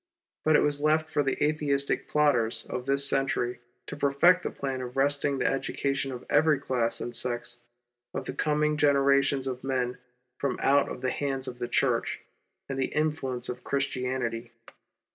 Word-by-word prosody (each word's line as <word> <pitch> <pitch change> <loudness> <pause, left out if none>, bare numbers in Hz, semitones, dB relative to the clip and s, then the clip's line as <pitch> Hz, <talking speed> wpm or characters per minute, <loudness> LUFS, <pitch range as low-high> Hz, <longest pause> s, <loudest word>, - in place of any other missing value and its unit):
But 155 0 +4
it - - +6
was 145 -1 0
left 155 +1 +2
for 145 - +2
the 135 -2 0
Atheistic 145 -2 0
plotters 140 -7 +2
of 125 +1 -5
this 140 0 +2
century 125 -3 0 0.3
to - - -7
perfect 145 +6 +4
the - - -3
plan 135 -2 -4
of 125 +1 -7
wresting 140 0 +2
the 125 - -1
education 135 0 -1
of 125 -1 -7
every 150 0 +4
class 120 -4 -1
and 120 - -4
sex 120 0 -2 0.5
of 130 - -4
the - - -4
coming 150 0 +1
generations 140 -1 +3
of 130 -1 -4
men 125 -2 -1 0.4
from 140 -2 -1
out 140 +1 +4
of - - -7
the 130 - 0
hands 135 -2 -2
of 125 - -7
the 120 - -2
Church, 120 -1 0 0.5
and 135 -1 -4
the 130 - -2
influence 150 -5 -1
of 125 0 -6
Christianity. 125 -4 -2
135 Hz, 170 wpm, -28 LUFS, 125-145 Hz, 0.5 s, it